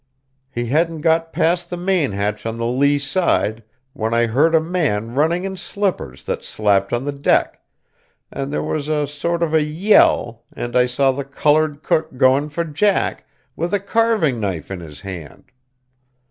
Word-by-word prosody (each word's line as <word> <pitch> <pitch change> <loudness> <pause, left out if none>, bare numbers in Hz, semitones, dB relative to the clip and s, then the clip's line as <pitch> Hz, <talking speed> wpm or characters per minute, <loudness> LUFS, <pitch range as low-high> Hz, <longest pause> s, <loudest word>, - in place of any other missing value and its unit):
He 120 -3 -3
hadn't 160 +5 0
got 165 +1 +2
past 175 +1 0
the 175 - -4
main 180 - +1
hatch 105 +2 -2
on 115 0 -4
the 115 - -2
lee 140 +4 +2
side, 140 - 0 0.3
when 115 -4 -2
I 120 0 +3
heard 145 +9 +3
a - - +6
man 150 - -1
running 160 +6 +1
in 190 0 -4
slippers 185 - -3
that - - -4
slapped 100 -2 +1
on 120 +2 -1
the 145 - -1
deck, 140 0 +1 0.7
and 135 +1 -4
there - - -1
was 150 -1 -3
a 150 -1 +1
sort 170 +4 -2
of 160 -2 -1
a 160 - +4
yell 150 - +3
and 120 0 -5
I 125 0 +4
saw 135 +2 +2
the 140 +2 -4
coloured 150 +2 +1
cook 155 -4 0
going 135 +4 +3
for 170 +3 -2
Jack, 165 +6 0 0.3
with 175 +4 -1
a - - +1
carving 200 - +1
knife 95 -5 -4
in 95 - -4
his 75 -4 -11
hand. 90 - -9
145 Hz, 175 wpm, -20 LUFS, 115-165 Hz, 0.7 s, a